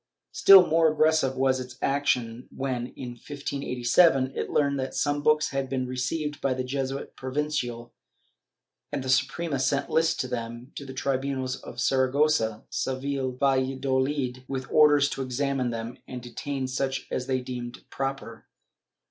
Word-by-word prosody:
Still 195 - +8
more 160 -1 +3
aggressive 155 -3 +2
was 130 0 +2
its 125 -1 -8
action 125 -4 0
when, 130 -3 -3
in 125 - -6
1587, 135 +2 +1
it - - -3
learned 140 -2 +1
that 130 0 -4
some 145 0 0
books 150 +1 +3
had 135 -1 -2
been 130 -1 -1
received 140 +4 -3
by 135 -2 +1
the 130 - -2
Jesuit 135 +1 -4
Provincial, 130 -4 -3 1.0
and 135 - -3
the 130 - -4
Suprema 145 +2 +1
sent 140 +1 0
lists 160 -3 +2
of 130 - -7
them 120 +1 -5
to 140 - -8
the 130 - -7
tribunals 130 -1 -1
of 120 - -10
Saragossa, 130 -4 +2
Seville 130 0 -2
and 125 0 -10
ValladoHd, 130 -1 0
with 130 -1 -5
orders 145 -2 +6
to 135 - -4
examine 135 0 -1
them 115 +2 -5
and 125 - -6
detain 130 +2 -4
such 135 +1 -2
as 125 - -2
they 130 -1 +1
deemed 125 -1 -7
proper. 135 -5 -5
130 Hz, 150 wpm, -27 LUFS, 125-140 Hz, 1.0 s, Still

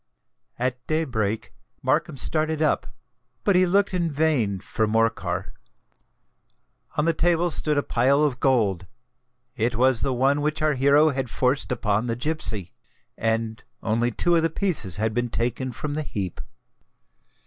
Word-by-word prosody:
At 125 0 -2
day 155 +1 +1
break 110 -6 -2 0.3
Markham - - 0
started 155 +4 +1
up; 155 - +1 0.6
but 200 - +3
he 185 0 +5
looked 200 +2 +2
in 170 -3 0
vain 140 -10 +1
for 110 +4 -1
Morcar. 100 -5 -1 1.4
On 150 - +2
the 165 - +3
table 170 +1 +1
stood 150 -1 +1
a 145 - +2
pile 135 +5 +2
of 135 -4 0
gold: 105 -10 +1 0.7
it 115 +1 0
was 125 -1 +3
the 135 - 0
one 135 +4 +2
which 150 +1 -1
our 155 -1 +3
hero 140 +3 +4
had 135 -3 -2
forced 130 +3 0
upon 110 -1 0
the 115 - -1
gipsy;—and 115 - -3 0.2
only 115 +2 +1
two 175 +8 +1
of 165 - +4
the 165 - +1
pieces 160 - -1
had 110 +2 -1
been 120 +1 -1
taken 125 +3 -2
from 145 +5 -5
the 155 - -2
heap. 100 - -5
130 Hz, 150 wpm, -24 LUFS, 110-155 Hz, 1.4 s, he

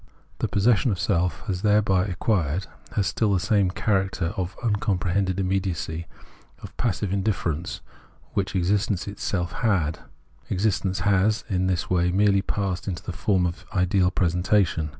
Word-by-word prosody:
The - - 0
possession 110 +4 +3
tlie 95 - -1
self 90 -2 0
has 90 -2 -2
thereby 105 -3 +3
acquired, 90 - 0 0.3
has 100 - +1
still 110 0 +1
the 95 - +2
same 100 0 +2
char 95 +1 +1
acter 95 -1 -3
of 95 -3 -3
imcomprehended 95 -4 0
immediacy, 90 -3 -2 0.6
of - - -10
passive 100 -4 -1
in 100 - +1
difference, 90 -5 -2 0.5
which 95 -1 -1
existence 95 +1 +1
itself 95 -3 -2
had; 90 -10 0 0.5
existence 95 -1 0
has 100 +2 +2
in 95 -2 +1
this 90 -1 -1
way 90 -1 +3
merely 100 +1 +3
passed 95 -1 -2
into 90 -4 -4
the - - -4
form 95 -1 +1
of 85 +1 -4
an - - -2
ideal 90 0 +3
presentation. 90 -2 +1
95 Hz, 150 wpm, -25 LUFS, 90-100 Hz, 0.6 s, possession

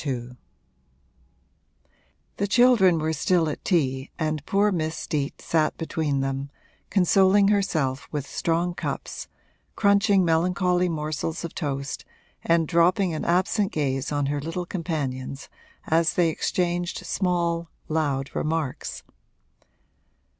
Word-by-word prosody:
II 125 -4 -3 2.1
The 200 - 0
children 220 -6 +5
were 160 0 -1
still 165 +2 +2
at 150 - -6
tea 135 -6 0
and 155 -2 -2
poor 205 +1 +3
Miss 160 -3 -2
Steet 145 -2 -3
sat 155 -2 +1
between 155 -4 -1
them, 135 +1 -2 0.4
consoling 195 +1 +4
herself 155 -10 0
with 145 -2 -3
strong 170 +3 -1
cups, - - -5 0.5
crunching 200 -2 +4
melancholy 180 +2 +2
morsels 155 +1 -3
of 170 - -7
toast 140 -4 -3 0.4
and 165 -1 +2
dropping 175 +1 +3
an 155 - -3
absent 190 +4 +1
gaze 135 -2 -1
on 145 -1 0
her 145 +1 -1
little 165 +4 -4
companions 140 -7 -4 0.4
as 160 0 +2
they 175 -2 +3
exchanged 175 +2 -1
small, 170 -3 0 0.2
loud 145 -4 -1
remarks. 155 -4 -3
165 Hz, 115 wpm, -25 LUFS, 145-180 Hz, 2.1 s, children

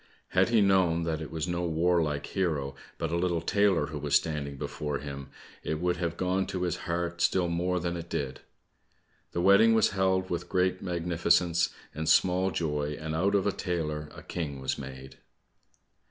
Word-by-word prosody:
Had - - +3
he 115 -2 +4
known 95 -4 +3
that 80 -1 -2
it 80 - -6
was 80 0 -3
no 85 0 -1
warlike 80 -3 +1
hero, 75 -8 -1 0.2
but 80 - -2
a - - 0
little 85 -1 +1
tailor 95 -1 +2
who 75 0 -6
was 70 0 0
standing 70 -3 0
before 75 +1 -3
him, 70 -1 -7 0.3
it 80 - -3
would 90 +1 0
have 85 -1 -2
gone 95 +1 0
to 90 -1 -3
his 90 - 0
heart 85 0 -2
still 90 -2 +2
more 90 +2 0
than 85 0 -2
it 85 0 -7
did. 70 -2 -3 0.9
The 85 - -1
wedding 100 +5 +6
was 110 - +4
held 95 -1 +1
with 85 - -3
great 90 0 +1
magnificence 85 -1 +2 0.2
and 80 +1 -2
small 90 +3 +4
joy, 75 -4 -2
and 80 0 -4
out 95 +6 +2
of 100 - +2
a 100 - +2
tailor 75 -6 -3
a - - -10
king 75 -5 -4
was 65 - -1
made. 65 -1 -9
85 Hz, 185 wpm, -29 LUFS, 75-90 Hz, 0.9 s, wedding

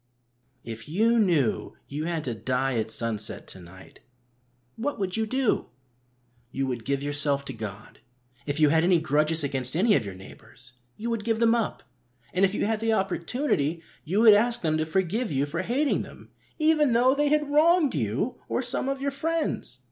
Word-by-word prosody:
If 115 +4 -8
you 225 +8 +3
knew 165 - +1
you 150 +3 -4
had 165 -2 -2
to 120 - -3
die 125 +3 -1
at 110 0 -2
sunset 110 -2 -2
to - - -10
night, 95 +1 -15 0.8
what 280 +6 -3
would 190 -2 -2
you 220 0 0
do? 260 0 0 0.8
You 135 +2 -2
would 120 -4 -4
give 140 0 -1
yourself 145 -1 +1
to - - -5
God. 110 -1 -8 0.5
If 145 +1 -2
you 155 -1 +5
had 160 +2 +3
any 175 -1 +4
grudges 155 +1 +2
against 135 -1 -2
any 205 +6 +4
of 130 - +1
your 100 -3 -7
neighbours, 120 +6 -13 0.2
you 235 +2 -3
would 230 -2 -2
give 225 0 0
them 230 0 +4
up, 230 -3 -2 0.5
and 185 - +1
if 195 +1 +3
you - - 0
had 220 0 0
the 225 0 +1
opportunity 180 - -1 0.2
you 190 +7 0
would 225 -2 +9
ask 230 +2 +2
them 155 -1 +1
to 155 - -1
forgive 190 +6 -1
you 140 0 +1
for 160 +4 -3
hating 265 +9 0
them, - - -12 0.3
even 310 -4 +3
though 250 +3 +4
they 290 +1 +1
had 295 -1 +1
wronged 315 0 +4
you 130 - -2
or 255 - -1
some 255 +2 0
of 275 0 -3
your 280 0 -1
friends. 320 +3 -2
175 Hz, 190 wpm, -26 LUFS, -, 0.8 s, would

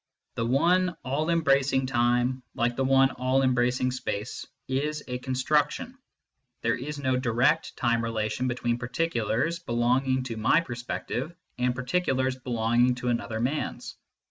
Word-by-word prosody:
The 115 - -2
one 175 +7 +2
all 145 +5 -1
embracing 140 -5 +2
time, 125 +1 +1
like 120 0 0
the 135 - 0
one 135 0 +4
all 130 +2 +1
embracing 125 0 +2
space, 120 -3 -4 0.2
is 150 +3 -1
a 125 -1 -3
construction; 150 - 0 0.7
there 115 0 +2
is 145 +4 -5
no 130 -2 0
direct 130 +6 +1
time 120 -1 +1
relation 115 +2 -1
between 120 -1 -1
particulars 130 +3 -1
belonging 130 -1 +1
to 115 -3 -5
my 110 +8 +4
per 150 -7 -6
spective 125 +5 -4 0.2
and 125 0 +1
particulars 130 -1 0
belonging 120 0 +1
to 125 0 -3
another 115 -2 -2
man 130 +6 -1
s. - - -10
130 Hz, 145 wpm, -27 LUFS, 120-135 Hz, 0.7 s, one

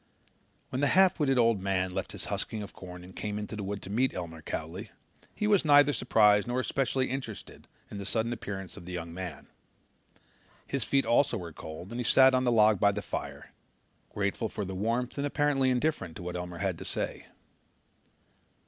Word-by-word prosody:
When 130 - -2
the 145 - +4
half 190 -2 +5
witted 135 -3 +2
old 115 -4 +3
man 95 -1 0
left - - -3
his - - -5
husking 110 -2 -3
of 100 - -10
corn 90 -1 -10
and 90 +1 -13
came 105 -1 -3
into 105 +1 -5
the 105 - -4
wood 100 0 -4
to 95 - -8
meet 125 +4 +1
Elmer 80 -3 -6
Cowley, 85 +8 -5 0.5
he 210 - -1
was 205 -3 +4
neither 145 -1 +6
surprised 105 -5 +4
nor 120 +1 0
especially 130 +1 0
interested 130 -6 -6 0.2
in 100 - -6
the 100 - -5
sudden 115 +3 0
appearance 95 -6 -6
of 85 - -11
the 90 - -6
young 85 -1 -5
man. 85 -6 -6 1.2
His 135 -3 -2
feet 135 +5 +2
also 120 0 +3
were 85 -4 -7
cold 80 +6 -9
and 120 - -4
he - - 0
sat 130 +2 +6
on 130 0 +2
the 120 - +3
log 110 -3 +5
by 100 - +5
the 100 0 -4
fire, - - -6 0.6
grateful 105 +2 -1
for 105 - -4
the 95 - -5
warmth 115 +7 -1
and 145 - 0
apparently 145 -2 +2
indifferent 125 - 0
to - - -8
what 90 0 -4
Elmer 90 -1 -5
had - - -2
to - - -6
say. - - -3
105 Hz, 200 wpm, -29 LUFS, 95-130 Hz, 1.2 s, neither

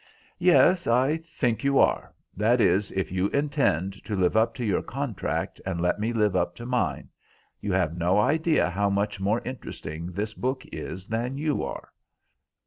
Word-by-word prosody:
"Yes, 180 0 +5
I 130 +6 +3
think 125 -9 -2
you 140 0 +2
are: - - +2 0.2
that 115 +5 +3
is, 105 -2 +2
if 95 -2 -2
you 95 +1 +1
intend 100 - 0
to 105 - -2
live 90 0 +1
up 110 +4 +3
to 125 -3 -3
your 100 -4 +1
contract, - - -3
and 95 -3 -3
let 90 +4 +1
me 110 +3 0
live 105 -4 +1
up 90 -1 0
to 120 - -9
mine. 120 -6 -1 0.5
You 100 - -3
have 90 -3 +1
no 90 +3 +2
idea 155 +7 +2
how 100 +2 +1
much 100 0 -1
more 105 +4 +1
interesting 85 -10 -6
this 105 +4 -3
book 130 +3 -2
is 95 +1 -6
than 120 +5 -2
you 150 0 0
are." 70 - -6
105 Hz, 175 wpm, -26 LUFS, 95-130 Hz, 0.5 s, Yes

